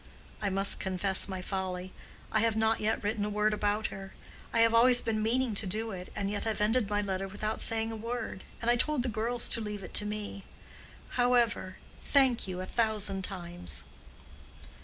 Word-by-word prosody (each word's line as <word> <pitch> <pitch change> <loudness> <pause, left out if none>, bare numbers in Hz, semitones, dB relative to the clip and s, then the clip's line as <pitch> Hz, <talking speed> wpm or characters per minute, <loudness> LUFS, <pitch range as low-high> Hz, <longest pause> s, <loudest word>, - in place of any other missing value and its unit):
"I 205 - +1
must 195 +1 +3
confess 190 0 0
my 190 -2 -5
folly. 185 -1 -3 0.4
I 220 - +3
have 225 0 +2
not 220 0 +2
yet 215 0 0
written 205 +1 0
a 210 - -1
word 210 +1 +2
about 210 +1 0
her. 195 0 -9 0.4
I 230 - +3
have 230 0 +5
always 245 +2 +7
been 220 -2 -1
meaning 235 +2 +1
to 200 0 -1
do 220 +4 -2
it, 180 -2 -7
and 200 - -1
yet 205 0 -2
have 220 -1 -1
ended 215 +1 +2
my 205 0 +1
letter 195 -1 -2
without 215 +2 -3
saying 225 0 0
a - - -4
word. 230 -2 -4 0.2
And 235 - +4
I 240 - +3
told 290 0 +1
the 250 - -1
girls 235 +2 0
to 230 - +2
leave 210 -2 -5
it - - -9
to 210 - +4
me. 210 -1 -5 0.7
However!—Thank 245 +1 +1
you 185 -1 -4
a - - -4
thousand 210 -3 +1
times." 170 - -4
210 Hz, 190 wpm, -31 LUFS, 195-230 Hz, 0.7 s, always